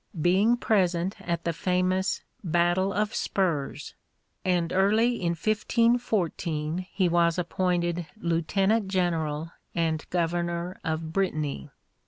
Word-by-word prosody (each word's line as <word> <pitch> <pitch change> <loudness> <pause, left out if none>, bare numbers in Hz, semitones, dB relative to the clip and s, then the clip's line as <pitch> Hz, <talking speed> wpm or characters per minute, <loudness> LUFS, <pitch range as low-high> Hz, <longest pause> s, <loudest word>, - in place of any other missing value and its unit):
being 195 +9 +3
present 185 -5 +1
at 170 -1 -2
the 170 - -1
famous 185 +3 0 0.2
"Battle 175 +2 +2
of 210 +2 -1
Spurs;" 165 -8 -1 0.5
and 175 -2 +1
early 215 +6 +3
in 170 -1 +1
1514 185 -5 0
he 190 -2 +2
was 170 0 +2
appointed 175 -1 0
Lieutenant 190 +5 +1
General 165 -4 -1 0.2
and 160 -2 0
Governor 170 +1 -1
of 160 -2 -3
Brittany. 155 - -1
175 Hz, 105 wpm, -27 LUFS, 165-190 Hz, 0.5 s, being